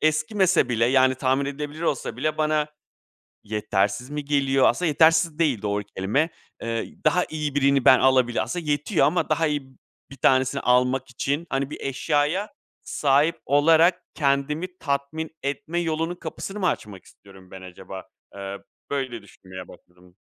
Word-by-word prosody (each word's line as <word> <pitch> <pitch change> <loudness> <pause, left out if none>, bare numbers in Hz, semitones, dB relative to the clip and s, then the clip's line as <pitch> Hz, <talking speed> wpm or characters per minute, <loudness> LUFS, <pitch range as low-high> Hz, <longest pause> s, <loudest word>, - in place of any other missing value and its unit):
eskimese 155 - +2
bile 115 -1 +1
yani 130 +1 +4
tahmin 130 +2 0
edilebilir 150 +3 -6
olsa 135 -8 -2
bile 155 +5 -2
bana 155 -1 +1 0.8
yetersiz 105 +3 -1
mi 150 -1 -5
geliyor? 135 -2 +2
Aslında 175 +9 +1
yetersiz 160 +1 +3
değil 145 -10 +1
doğru 105 0 -1
kelime. 110 - 0 0.3
Eee, 115 0 -4
daha 180 +4 +3
iyi 150 -2 -3
birini 140 -2 +2
ben 130 - +7
alabilir 130 -4 +3
Aslında 160 +9 -5
yetiyor 145 +5 +1
ama 175 +4 0
daha 165 - +2
iyi 150 -1 -1 0.5
1 135 - -11
tanesini 130 +1 +2
almak 125 +1 +2
için, 140 +6 -2
hani, 135 0 -1
bir - - -8
eşyaya 150 +8 0 0.3
sahip 145 +3 +1
olarak 160 +5 +4
kendimi 150 +5 -1
tatmin 145 +2 -3
etme 155 +4 -2
yolunun 165 +1 -2
kapısını 195 +3 -7
mı 185 - +1
açmak 105 - -4
istiyorum 95 -2 -18
ben 95 - -10
acaba? 95 +1 -10 0.3
Eee, 100 0 -6 0.3
böyle 130 -5 -3
düşünmeye 95 -2 -11
başladım. 90 0 -19
140 Hz, 150 wpm, -24 LUFS, 120-155 Hz, 0.8 s, ben